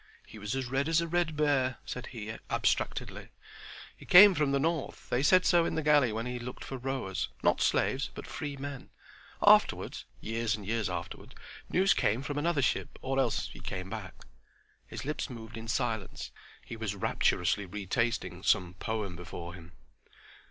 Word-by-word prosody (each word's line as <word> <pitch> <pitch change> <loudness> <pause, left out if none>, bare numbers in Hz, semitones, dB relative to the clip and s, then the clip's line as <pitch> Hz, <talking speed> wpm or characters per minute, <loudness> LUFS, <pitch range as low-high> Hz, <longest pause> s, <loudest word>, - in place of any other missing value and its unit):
"He 110 - -12
was 105 +4 -3
as 135 -1 -2
red 135 +4 0
as 165 0 +4
a 170 - -1
red 170 -2 0
bear," 140 -4 +2
said 125 - -6
he, 110 -3 -6
abstractedly. - - -1 0.7
"He - - -15
came 195 +2 +9
from 150 -4 +1
the 140 - +3
north; 160 +1 -2
they 125 - +2
said 180 +6 +5
so 175 -1 +5
in - - -1
the 160 - -1
galley 145 -5 +4
when 110 +2 -3
he 125 0 -4
looked 125 +1 -7
for 135 - -6
rowers—not 130 -7 -1
slaves, - - +1
but - - -7
free 145 -1 -5
men. 140 -1 -7 0.6
Afterward—years 115 0 +2
and 105 -2 -9
years 110 0 -1
afterward—news 190 +1 -2
came 115 +6 +1
from 145 0 -3
another 155 -2 +1
ship, 135 - -1
or 135 +1 0
else 135 - 0
he - - -11
came 95 0 -5
back"—His - - -11
lips 150 +1 -3
moved 115 -2 -9
in 115 0 -7
silence. 110 -3 -2 0.3
He - - -7
was 110 -3 -3
rapturously 95 0 +1
retasting 100 -1 -2
some 90 -2 +2
poem 105 -5 -3
before 85 0 -8
him. 85 -1 -12
125 Hz, 165 wpm, -30 LUFS, 105-145 Hz, 0.7 s, came